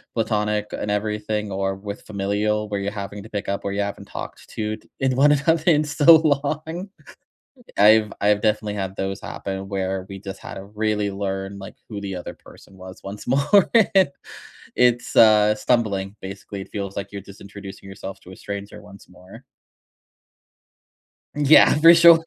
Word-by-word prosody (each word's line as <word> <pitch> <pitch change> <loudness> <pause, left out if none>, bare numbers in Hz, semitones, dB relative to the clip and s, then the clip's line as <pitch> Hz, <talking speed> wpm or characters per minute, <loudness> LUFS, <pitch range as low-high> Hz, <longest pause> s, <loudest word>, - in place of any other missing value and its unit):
platonic 105 -2 0
and 105 - -4
everything, 105 0 -2
or 95 0 -1
with 100 +1 -7
familial, 105 +1 -1
where 100 -1 -2
you're 100 +1 -3
having 100 -1 -6
to 110 - -12
pick 100 -3 -4
up 100 - -2
where 100 - -2
you 100 - -1
haven't 100 0 -5
talked - - -9
t 110 0 -3
to - - -24
in 130 -1 +1
one 145 +2 +5
another 155 +3 +1
in 155 -3 +5
so 150 +2 +6
long. 155 +4 -1 0.9
I've 105 +1 +5
I've 105 0 +3
definitely 105 -1 0
had 95 -2 -4
those 95 0 -3
happen, 95 0 -6
where 95 -1 -3
we 100 -1 -8
just 95 0 -8
had - - -8
to 95 - -8
really 105 0 -1
learn, 95 0 -4
like, 95 - -10
who 105 -3 -6
the 100 -1 -5
other 90 - -7
person 95 - -17
was 95 0 -11
once 100 +2 -8
more. 145 +9 +3 1.1
It's 125 -1 +2
uh, 105 -1 +6
stumbling, 105 -4 0
basically. 100 +1 -7
It - - -10
feels 100 -2 -5
like 100 0 -5
you're 100 -1 -6
just 100 +1 -15
introducing 100 -1 -10
yourself 95 0 -8
to 90 - -14
a - - -10
stranger 100 +1 -7
once 100 -1 -15
more. 90 +1 -15 1.9
Yeah. 150 +1 +6
For 165 +2 +8
sure. 170 -1 +7
105 Hz, 170 wpm, -22 LUFS, 100-110 Hz, 1.9 s, For